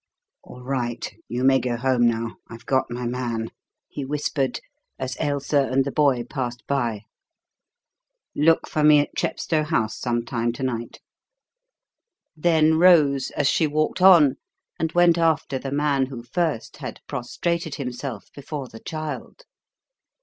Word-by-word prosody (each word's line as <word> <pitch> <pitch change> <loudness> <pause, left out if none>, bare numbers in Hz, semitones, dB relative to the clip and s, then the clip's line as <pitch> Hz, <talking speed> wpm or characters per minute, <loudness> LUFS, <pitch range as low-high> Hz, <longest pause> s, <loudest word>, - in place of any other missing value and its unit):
"All 125 0 -13
right. 125 -3 -3
You 125 +1 -3
may 135 0 +5
go 120 -2 -2
home 125 -1 +2
now. 115 0 -2
I've 115 0 -11
got 130 -1 +1
my 120 0 -4
man," 120 -2 -3 0.4
he 145 - -6
whispered, 140 -1 -1 0.4
as 130 0 -4
Ailsa 145 -1 +1
and 135 +1 +2
the 140 - -2
boy 140 -5 +2
passed 120 -2 -5
by. 120 -7 -1 1.3
"Look 160 +2 +3
for 155 - -1
me 150 0 +7
at 145 - -6
Chepstow 160 -2 -1
House 150 -9 -1
some 120 -1 -1
time 120 -1 -1
to 125 - -6
night." 120 -2 -4 1.3
Then 160 -1 +3
rose, 150 -7 +5
as 145 - +2
she 160 - +2
walked 155 +4 -1
on, 170 -8 +7 0.4
and 160 0 -1
went 175 -1 +4
after 160 -5 +1
the 135 - -5
man 140 -2 +1
who 125 -3 -8
first 150 0 -2
had - - -7
prostrated 165 +6 -3
himself 125 -4 -6
before 140 -1 -6
the 115 - -11
child. 155 - -6
135 Hz, 145 wpm, -23 LUFS, 120-155 Hz, 1.3 s, me